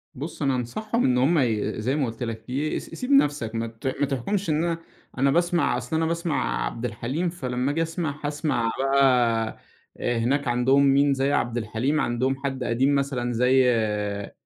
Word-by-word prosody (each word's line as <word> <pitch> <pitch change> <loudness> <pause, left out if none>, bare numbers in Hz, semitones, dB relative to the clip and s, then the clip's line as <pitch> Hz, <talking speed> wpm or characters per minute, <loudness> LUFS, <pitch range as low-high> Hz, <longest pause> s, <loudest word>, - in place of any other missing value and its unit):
بُصّ 150 +6 -7
أنا 135 -2 +2
أنصحهم 215 - -2
إن 125 -1 +3
هُم 150 +7 +3
ي 110 -3 0
زي 130 +5 0
ما 145 -3 +1
قُلت 115 +2 -5
لك 115 +1 -6
ي 145 +4 -1
س - - -11
سيب 250 +11 -5
نَفسك، 145 - +3
ما 115 0 -1
ت 115 +3 -7
ما 145 - +3
تحكمش 165 - -2
إن 155 +2 +1
أنا 170 -1 0 0.4
أنا 135 +1 +3
باسمع 170 -5 +2
أصل 125 +6 -4
أنا 160 0 +1
باسمع 170 0 -1
عبد 115 +1 -4
الحليم، 130 +10 -2
فلمّا 130 -5 -2
آجي 165 +2 -1
أسمع 165 -3 -3
هاسمع 145 -6 0
بقى 125 -5 +2 0.4
هناك 120 +4 0
عندهم 125 +3 +3
مين 140 +1 +4
زي 135 +1 0
عبد 120 -4 0
الحليم، 120 +7 -1
عندهم 125 +3 0
حد 135 -2 -2
قديم 130 +5 +2
مثلًا 130 -3 -1
زي 130 +2 +4
آآ، 105 -3 -1
135 Hz, 185 wpm, -25 LUFS, 120-150 Hz, 0.4 s, مين